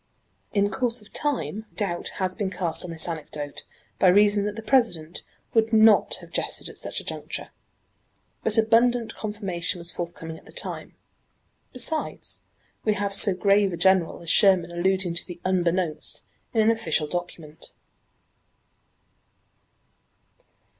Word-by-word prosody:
In 205 -1 +1
course 240 +3 0
of 210 - -20
time 220 - -2
doubt 185 -5 -3
has 185 -1 +1
been 200 -1 -2
cast 175 -3 0
on 180 - -7
this 165 0 +3
anecdote 150 -3 -6 0.4
by 190 - +4
reason 205 +2 +4
that 205 0 -3
the 225 - -7
President 180 - +1 0.3
would 225 -1 +2
not 220 -1 +5
have - - -14
jested - - 0
at - - -9
such - - -3
a - - -9
juncture. - - -5 0.9
But - - +4
abundant 230 +1 +3
confirmation 195 -4 -3
was 170 0 0
forthcoming 165 -2 -7
at - - -24
the - - -13
time. - - -6 0.8
Besides, 275 +5 0 0.4
we 215 -1 +1
have 200 0 -2
so 200 -1 +7
grave 200 0 +2
a - - -4
general 190 -2 +2
as 165 - 0
Sherman 185 -5 +4
alluding 185 0 0
to 170 - -2
the 175 -2 -9
"Unbeknownst" 180 -3 +1 0.3
in 225 - +2
an 220 +1 +4
official 165 -9 0
document. 165 -2 -5
190 Hz, 140 wpm, -24 LUFS, 170-220 Hz, 0.9 s, so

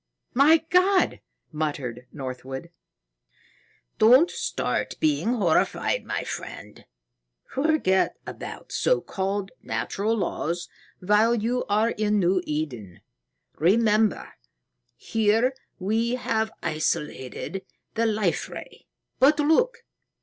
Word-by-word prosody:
"My 310 +5 +5
God!" 370 +1 +3 0.3
muttered 135 -6 -3
Northwood. 130 +3 -7 1.3
"Don't 255 +11 +6
start 465 0 -2
being 295 -6 +1
horrified, 180 -8 +1
my - - -2
friend. - - -8 0.6
Forget 275 -10 +1
about - - -8
so - - +2
called 195 0 -3
natural 220 +3 -1
laws 175 -2 -2 0.3
while 210 +5 +4
you 235 +3 -1
are 215 +3 +2
in 210 0 0
New 185 -1 +2
Eden. 125 - -4 0.6
Remember, 215 +5 +2 0.6
here 225 +4 +1 0.2
we 225 +5 0
have 225 -3 -1
isolated 155 +2 -2 0.3
the 230 0 +1
Life 210 -5 0
Ray. - - -10 0.3
But 295 +3 +5
look! 470 +12 +2
215 Hz, 95 wpm, -25 LUFS, 170-250 Hz, 1.3 s, Don't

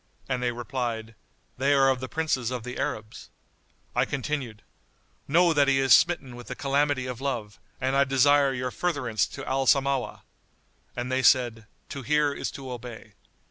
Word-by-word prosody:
and 130 -2 -2
they 125 -1 0
replied, 120 -2 -4 0.5
"They 140 +2 +3
are 135 -1 +5
of 130 -1 +2
the 130 0 -6
princes 150 -7 -1
of 125 -2 -4
the 125 +1 -6
Arabs." 110 0 -5 0.7
I - - +3
continued, 130 -5 -4 0.6
"Know 170 +3 +4
that 145 -2 +3
he 135 -1 +3
is 135 -3 +5
smitten 135 -3 +3
with 120 0 -11
the - - -5
calamity 140 -1 0
of 125 -1 -6
love 120 -7 -4 0.2
and 130 +1 0
I 140 - +5
desire 140 +1 +4
your 125 -1 -3
furtherance 135 -11 -1
to - - -8
Al 135 0 0
Samawah." 135 -1 +1 0.7
And 125 +1 -4
they 130 0 +1
said, 120 -4 +3 0.2
"To 140 - -6
hear 145 +2 +1
is - - -4
to 135 -2 -8
obey." 120 -3 -9
130 Hz, 175 wpm, -26 LUFS, 120-140 Hz, 0.7 s, are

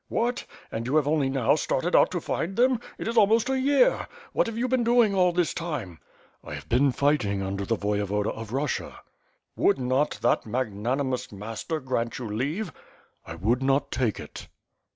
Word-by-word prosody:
"What! 240 +2 -1 0.3
and 115 +2 -4
you 135 - 0
have 150 -2 +3
only 150 -3 +2
now 135 -4 +2
started - - 0
out - - +6
to - - -2
find 190 +4 -3
them? 250 0 +3 0.2
It - - -5
is 230 - -2
almost 225 +4 +4
a 265 - +1
year! 285 - +3 0.3
What - - +2
have 230 -1 -5
you 245 +2 0
been 255 -1 +1
doing 235 -3 +4
all 180 -2 +4
this 175 -1 0
time?" 145 - -5 0.4
"I - - -7
have - - -9
been 135 +3 +3
fighting 120 -9 +1
under 100 0 -3
tne 115 - +1
Voyevoda 105 0 -1
of 110 -1 -8
Russia." 135 +2 -3 0.5
"Would - - +3
not 130 +3 0
that - - +3
magnanimous 125 +3 -2
master 110 +10 -4
grant 125 -4 -2
you 125 - -5
leave?" 145 - -2 0.5
'1 85 0 -9
would 120 +6 +2
not 135 +1 +1
take 120 -5 0
it." - - -9
135 Hz, 185 wpm, -26 LUFS, -, 0.5 s, out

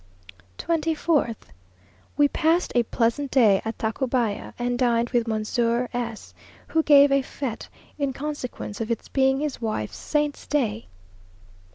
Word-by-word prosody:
24th. 320 -6 0 0.8
We 290 - +5
passed 330 +4 +1
a 245 - +4
pleasant 235 +4 0
day 220 -8 +4
at 225 0 -4
Tacubaya, 230 -1 -1
and 245 0 -1
dined 235 -2 +2
with 240 -2 +1
Monsieur 230 +2 0
S, 235 -2 -5 0.4
who 320 - +2
gave 285 -2 +6
a 275 0 +4
fête 260 -3 -5 0.3
in 280 -2 0
consequence 260 -6 -5
of 225 - -3
its 230 - -3
being 265 0 +2
his 295 -4 -3
wife's 215 - -3
saint's 295 -1 -2
day. 230 -7 -1
245 Hz, 135 wpm, -24 LUFS, 230-285 Hz, 0.8 s, gave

